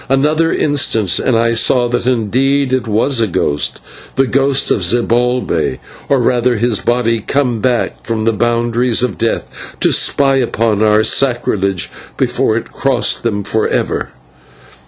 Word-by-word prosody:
Another 150 Hz, +4 st, +2 dB
instant, 115 Hz, -, 0 dB
and 125 Hz, -3 st, +1 dB
I 115 Hz, 0 st, +2 dB
saw 120 Hz, +2 st, +2 dB
that 120 Hz, 0 st, -2 dB
indeed 130 Hz, +3 st, +1 dB
it 130 Hz, -3 st, -1 dB
was 115 Hz, +4 st, +1 dB
a 110 Hz, -, +2 dB
ghost, 75 Hz, -5 st, -1 dB, 0.4 s
the 135 Hz, -, +2 dB
ghost 135 Hz, +1 st, +1 dB
of -, -, +1 dB
Zibalbay, 120 Hz, +5 st, 0 dB, 0.3 s
or 140 Hz, -, +3 dB
rather 120 Hz, 0 st, +1 dB
his 115 Hz, -1 st, +1 dB
body 120 Hz, -1 st, 0 dB
come 125 Hz, 0 st, -1 dB
back 125 Hz, +1 st, -1 dB
from 110 Hz, -1 st, -2 dB
the 115 Hz, -, +2 dB
boundaries 120 Hz, +2 st, 0 dB
of 105 Hz, -10 st, -2 dB
death -, -, -4 dB
to -, -, +2 dB
spy 135 Hz, -1 st, +2 dB
upon 115 Hz, -4 st, 0 dB
our 110 Hz, 0 st, +3 dB
sacrilege 105 Hz, -7 st, 0 dB, 0.3 s
before 110 Hz, -, 0 dB
it -, -, -6 dB
crossed 135 Hz, -3 st, 0 dB
them 105 Hz, -3 st, -2 dB
forever. 110 Hz, +2 st, -1 dB
120 Hz, 145 wpm, -15 LUFS, 110-130 Hz, 0.4 s, or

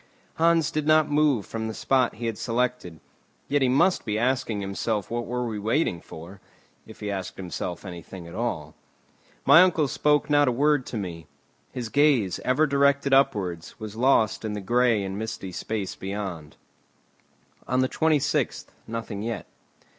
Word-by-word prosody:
Hans 165 Hz, -2 st, +3 dB
did 155 Hz, -1 st, -2 dB
not 155 Hz, -1 st, +4 dB
move 145 Hz, -7 st, +2 dB
from 110 Hz, 0 st, -4 dB
the 110 Hz, -, -5 dB
spot 130 Hz, -2 st, +1 dB
he 120 Hz, -, -6 dB
had 115 Hz, -2 st, -1 dB
selected; 120 Hz, -8 st, -2 dB, 0.5 s
yet 145 Hz, 0 st, +1 dB
he 130 Hz, -, +3 dB
must 170 Hz, +9 st, +3 dB
be 105 Hz, -1 st, -2 dB
asking 120 Hz, -2 st, 0 dB
himself 100 Hz, +1 st, -2 dB
what 120 Hz, 0 st, -2 dB
were 125 Hz, 0 st, -2 dB
we 110 Hz, -3 st, -4 dB
waiting 110 Hz, -, 0 dB
for, 90 Hz, +5 st, -11 dB, 0.5 s
if -, -, -13 dB
he 105 Hz, -1 st, -3 dB
asked 95 Hz, -2 st, -5 dB
himself 90 Hz, 0 st, -5 dB
anything 90 Hz, 0 st, -9 dB
at 85 Hz, -, -11 dB
all. 80 Hz, -9 st, -3 dB, 0.7 s
My 170 Hz, -, +8 dB
uncle 165 Hz, -5 st, +3 dB
spoke 150 Hz, +1 st, +2 dB
not 145 Hz, -1 st, +4 dB
a -, -, +3 dB
word 145 Hz, +1 st, +2 dB
to 115 Hz, -, -4 dB
me. 85 Hz, -6 st, -6 dB, 0.4 s
His 120 Hz, -3 st, -5 dB
gaze, 140 Hz, -10 st, +3 dB
ever 130 Hz, +5 st, +2 dB
directed 140 Hz, -1 st, +2 dB
upwards, 95 Hz, -12 st, +1 dB
was 110 Hz, -1 st, -7 dB
lost 115 Hz, -3 st, +2 dB
in 110 Hz, -1 st, -3 dB
the 105 Hz, -, -3 dB
grey 120 Hz, +1 st, +2 dB
and 95 Hz, +1 st, -4 dB
misty 110 Hz, -4 st, -5 dB
space 100 Hz, +2 st, -4 dB
beyond. 95 Hz, -6 st, -6 dB, 1.1 s
On 130 Hz, -, +1 dB
the 130 Hz, -, +2 dB
26th 155 Hz, 0 st, 0 dB, 0.2 s
nothing 115 Hz, -3 st, -5 dB
yet. 110 Hz, -4 st, -4 dB
115 Hz, 165 wpm, -25 LUFS, 100-140 Hz, 1.1 s, My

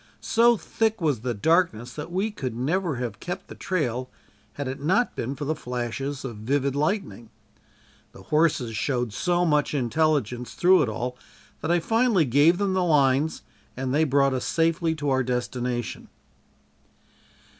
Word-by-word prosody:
So 235 Hz, +1 st, +4 dB
thick 220 Hz, +1 st, -1 dB
was 150 Hz, -, +1 dB
the 120 Hz, +1 st, -3 dB
darkness 125 Hz, -, +1 dB
that 155 Hz, +3 st, -7 dB
we 195 Hz, +5 st, -1 dB
could 130 Hz, -, -5 dB
never 160 Hz, +6 st, 0 dB
have 120 Hz, -4 st, -4 dB
kept 180 Hz, -, -6 dB
the -, -, -7 dB
trail 130 Hz, -8 st, -2 dB, 0.4 s
had 145 Hz, -2 st, -4 dB
it 135 Hz, +1 st, -5 dB
not 190 Hz, +11 st, +1 dB
been 130 Hz, +4 st, -3 dB
for 145 Hz, +2 st, -5 dB
the 155 Hz, -, 0 dB
flashes 130 Hz, 0 st, -4 dB
of 120 Hz, -5 st, -6 dB
vivid 135 Hz, +5 st, 0 dB
lightning. 150 Hz, -, -2 dB, 0.8 s
The -, -, -14 dB
horses 150 Hz, -7 st, +1 dB
showed 120 Hz, -2 st, -1 dB
so 175 Hz, -, +1 dB
much 150 Hz, -2 st, +1 dB
intelligence 130 Hz, -3 st, 0 dB
through 185 Hz, 0 st, +5 dB
it 130 Hz, -, +1 dB
all 125 Hz, +3 st, -4 dB, 0.4 s
that 155 Hz, -, -3 dB
I 175 Hz, 0 st, +3 dB
finally 225 Hz, -2 st, +2 dB
gave 145 Hz, +7 st, +4 dB
them 200 Hz, -1 st, 0 dB
the 185 Hz, -1 st, +1 dB
lines 145 Hz, -2 st, +2 dB, 0.3 s
and 130 Hz, 0 st, -2 dB
they 155 Hz, +2 st, +3 dB
brought 140 Hz, -2 st, +3 dB
us 130 Hz, -, -2 dB
safely 165 Hz, 0 st, +1 dB
to 145 Hz, -2 st, -2 dB
our 130 Hz, 0 st, +2 dB
destination. 125 Hz, -1 st, -3 dB
145 Hz, 160 wpm, -25 LUFS, 125-170 Hz, 0.8 s, through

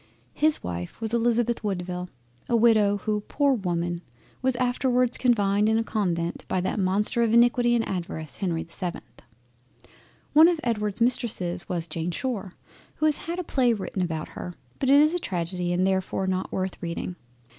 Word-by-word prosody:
His 310 Hz, 0 st, +2 dB
Wife 90 Hz, 0 st, -5 dB
was 225 Hz, 0 st, -3 dB
Elizabeth 235 Hz, 0 st, +1 dB
Woodville, 180 Hz, -2 st, -3 dB, 0.4 s
a 235 Hz, -, +3 dB
Widow 215 Hz, -3 st, +4 dB
who, 210 Hz, -1 st, 0 dB
poor 285 Hz, -1 st, +2 dB
Woman! 175 Hz, -5 st, -2 dB, 0.4 s
was 260 Hz, -1 st, +2 dB
afterwards 250 Hz, 0 st, +1 dB
confined 210 Hz, -4 st, +2 dB
in 220 Hz, -, +3 dB
a 225 Hz, -, +1 dB
Convent 175 Hz, -7 st, -2 dB
by 185 Hz, -, 0 dB
that 185 Hz, -, -2 dB
Monster 200 Hz, +5 st, +2 dB
of 230 Hz, -1 st, +3 dB
Iniquity 240 Hz, 0 st, +4 dB
and 230 Hz, -, 0 dB
Avarice 170 Hz, -4 st, -5 dB
Henry 170 Hz, -4 st, -1 dB
the 170 Hz, -, -20 dB
7th. 180 Hz, -3 st, -4 dB, 1.3 s
One 315 Hz, +2 st, +8 dB
of 345 Hz, -2 st, +1 dB
Edward's 210 Hz, -2 st, -1 dB
Mistresses 210 Hz, -8 st, +1 dB
was 170 Hz, -2 st, -2 dB
Jane 165 Hz, +1 st, -3 dB
Shore, 210 Hz, -2 st, -4 dB, 0.4 s
who 310 Hz, -, 0 dB
has 305 Hz, -1 st, +3 dB
had 340 Hz, +1 st, -5 dB
a 365 Hz, -, -2 dB
play 255 Hz, -6 st, +2 dB
written 195 Hz, -2 st, -4 dB
about 160 Hz, -3 st, -3 dB
her, 180 Hz, -, -7 dB, 0.2 s
but 265 Hz, -, 0 dB
it 280 Hz, +1 st, +7 dB
is 305 Hz, +2 st, +4 dB
a 355 Hz, -, 0 dB
tragedy 175 Hz, -, -2 dB
and 180 Hz, +1 st, +2 dB
therefore 190 Hz, 0 st, 0 dB
not 185 Hz, 0 st, -2 dB
worth 190 Hz, 0 st, -3 dB
reading. 170 Hz, +1 st, -4 dB
210 Hz, 175 wpm, -26 LUFS, 180-240 Hz, 1.3 s, One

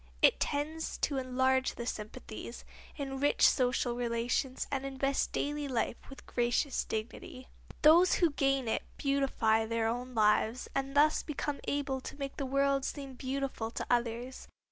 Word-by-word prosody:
It -, -, +6 dB
tends 310 Hz, +3 st, -2 dB
to 280 Hz, -2 st, +1 dB
enlarge 260 Hz, 0 st, +1 dB
the 235 Hz, -, -5 dB
sympathies, 220 Hz, +1 st, -7 dB, 0.3 s
enrich 275 Hz, 0 st, +3 dB
social 250 Hz, -1 st, +1 dB
relations 240 Hz, +2 st, -1 dB
and 270 Hz, -1 st, -1 dB
invest 275 Hz, 0 st, -1 dB
daily 290 Hz, 0 st, -2 dB
life 240 Hz, -2 st, -1 dB
with 270 Hz, -, -12 dB
gracious 245 Hz, +3 st, 0 dB
dignity. 235 Hz, +3 st, -6 dB, 0.3 s
Those 335 Hz, +4 st, +7 dB
who 340 Hz, -3 st, +3 dB
gain 275 Hz, -3 st, +1 dB
it 225 Hz, -, 0 dB, 0.2 s
beautify 265 Hz, -6 st, +1 dB
their 230 Hz, 0 st, 0 dB
own 245 Hz, +2 st, -3 dB
lives 220 Hz, +2 st, +2 dB
and 275 Hz, 0 st, -2 dB
thus 305 Hz, +1 st, +5 dB
become 295 Hz, -1 st, -3 dB
able 275 Hz, -2 st, -1 dB
to -, -, -8 dB
make 275 Hz, -1 st, -5 dB
the 275 Hz, -, -2 dB
world 275 Hz, 0 st, +2 dB
seem 275 Hz, 0 st, -4 dB
more 260 Hz, -, -11 dB
beautiful 265 Hz, -4 st, -3 dB
to -, -, -4 dB
others. 240 Hz, +1 st, -1 dB
265 Hz, 150 wpm, -32 LUFS, 240-275 Hz, 0.3 s, Those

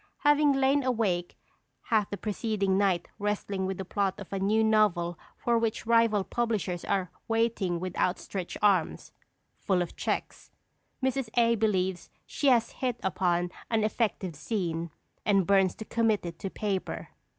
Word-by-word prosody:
Having 290 Hz, 0 st, +5 dB
lain 270 Hz, +1 st, +3 dB
awake 215 Hz, -9 st, -1 dB, 0.5 s
half 215 Hz, -4 st, +1 dB
the 205 Hz, -, -4 dB
preceding 210 Hz, -2 st, -1 dB
night 190 Hz, -3 st, +2 dB
wrestling 200 Hz, -2 st, -1 dB
with 190 Hz, -1 st, -3 dB
the 190 Hz, -, -5 dB
plot 195 Hz, +1 st, -1 dB
of 200 Hz, -1 st, -9 dB
a 195 Hz, -, -1 dB
new 215 Hz, +3 st, +2 dB
novel 205 Hz, -6 st, +2 dB, 0.2 s
for 235 Hz, -1 st, +1 dB
which 225 Hz, 0 st, -1 dB
rival 230 Hz, -3 st, +3 dB
publishers 205 Hz, -7 st, -2 dB
are 185 Hz, -3 st, -1 dB, 0.2 s
waiting 225 Hz, -6 st, 0 dB
with 185 Hz, 0 st, -5 dB
outstretched 185 Hz, 0 st, -2 dB
hands 190 Hz, -6 st, +2 dB, 0.5 s
(full 190 Hz, -2 st, +1 dB
of 175 Hz, -1 st, -3 dB
checks), -, -, -3 dB, 0.5 s
Mrs. 265 Hz, -2 st, 0 dB
A. 235 Hz, -1 st, +5 dB
believes 190 Hz, -5 st, 0 dB, 0.2 s
she 285 Hz, -, -2 dB
has 235 Hz, -3 st, +4 dB
hit 250 Hz, -3 st, -2 dB
upon 175 Hz, -1 st, 0 dB, 0.2 s
an 225 Hz, -2 st, +1 dB
effective 210 Hz, -5 st, -1 dB
scene, 170 Hz, -2 st, -2 dB, 0.3 s
and 195 Hz, -3 st, +3 dB
burns 195 Hz, -1 st, +3 dB
to 220 Hz, -, -8 dB
commit 225 Hz, -4 st, +1 dB
it 170 Hz, -1 st, -7 dB
to 195 Hz, -, -4 dB
paper. 195 Hz, -1 st, -3 dB
205 Hz, 150 wpm, -28 LUFS, 185-230 Hz, 0.5 s, Having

